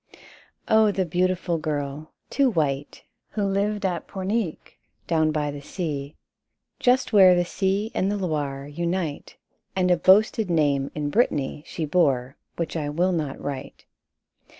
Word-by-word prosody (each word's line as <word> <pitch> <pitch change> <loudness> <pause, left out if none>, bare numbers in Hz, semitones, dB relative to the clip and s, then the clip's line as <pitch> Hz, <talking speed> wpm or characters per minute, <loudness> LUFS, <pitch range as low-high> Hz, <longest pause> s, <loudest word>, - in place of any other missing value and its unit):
Oh, 220 -1 +5
the 190 -2 0
beautiful 180 0 0
girl, 150 -1 -4 0.2
too 275 -2 +3
white, 145 - -2 0.3
Who 210 - -1
lived 200 +1 0
at 180 -3 -2
Pornic, 195 -2 -3 0.3
down 160 -2 +2
by 150 -1 -1
the 145 0 -8
sea, 145 -3 -4 0.6
Just 250 -1 +2
where 190 -3 +8
the 175 0 +1
sea 195 +4 -1
and 190 - 0
the 205 - -1
Loire 145 -7 -2
unite! 170 0 -3 0.4
And 180 -1 +2
a 175 - +4
boasted 205 +3 +4
name 145 -4 +2
in 145 -1 -2
Brittany 150 - 0
She 160 - -3
bore, 140 -5 +1 0.2
which 170 -1 -3
I 150 -3 -2
will 175 +5 +1
not 155 -6 -2
write. 140 -2 -6
170 Hz, 145 wpm, -24 LUFS, 145-190 Hz, 0.6 s, where